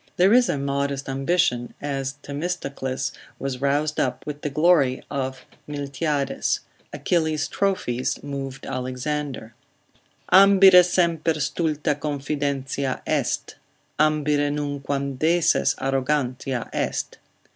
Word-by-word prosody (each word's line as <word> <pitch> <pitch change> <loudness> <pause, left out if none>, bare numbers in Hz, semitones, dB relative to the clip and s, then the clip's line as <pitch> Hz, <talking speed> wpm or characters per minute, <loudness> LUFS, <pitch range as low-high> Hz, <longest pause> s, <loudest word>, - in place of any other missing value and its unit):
There 190 +4 +5
is 245 0 +5
a - - 0
modest 140 0 -2
ambition, 135 -3 0
as 135 -2 -3
Themistocles 140 -4 -3 0.3
was 135 -2 -4
roused 145 +2 +1
up 125 -1 -1
with 150 -1 -6
the 150 - -2
glory 150 -3 +3
of 130 -2 -3 0.2
Miltiades; 145 0 -1 0.3
Achilles' 155 -4 0
trophies 150 -12 -1
moved 135 -2 -6
Alexander, 130 -1 -4 0.8
Ambire 190 -1 +8
semper 170 -2 +1
stulta 155 +1 0
confidentia 140 -2 -2
est, - - -1 0.4
Ambire 150 -1 +2
nunquam 140 -2 -3
deses 165 +2 +3
arrogantia 135 -2 -1
est. - - -2
145 Hz, 100 wpm, -24 LUFS, 135-155 Hz, 0.8 s, Ambire